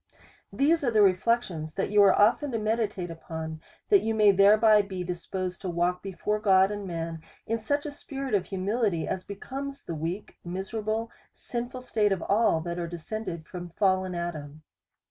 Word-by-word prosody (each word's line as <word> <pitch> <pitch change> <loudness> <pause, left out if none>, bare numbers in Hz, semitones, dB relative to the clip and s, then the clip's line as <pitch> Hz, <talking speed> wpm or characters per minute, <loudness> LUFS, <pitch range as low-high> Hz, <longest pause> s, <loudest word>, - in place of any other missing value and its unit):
These 310 +3 +2
are 250 - +2
the 215 -3 +4
reflections 185 -5 +1
that 195 - -1
you 210 0 +6
are 195 -2 +6
often 240 +7 +4
to - - +1
me 215 0 0
ditate 200 -6 -3
upon, 160 -1 -6 0.3
that 400 -2 +6
you 225 0 -1
may 210 -2 +6
thereby 210 +2 +6
be 190 -2 -5
disposed 180 +1 -4
to 185 - -3
walk 175 +1 0
before 205 +2 -2
God 195 -2 +4
and 205 -1 -5
man 165 -2 -4 0.2
in 230 +1 -1
such 285 +7 -1
a 295 - -4
spirit 275 -3 -6
of 195 -3 +2
humility, 195 -2 -1
as 185 - -3
becomes 270 +8 -6
the 170 - -5
weak, 165 +6 -5
miserable, 215 +5 -3 0.2
sinful 245 +1 -5
state 215 -4 +1
of 190 -3 -1
all 200 -6 +2
that 170 +1 -4
are 170 - -2
descended 175 0 -5
from 175 0 -7
fallen 185 0 +1
Adam. 155 -3 -5
195 Hz, 180 wpm, -27 LUFS, 175-220 Hz, 0.3 s, you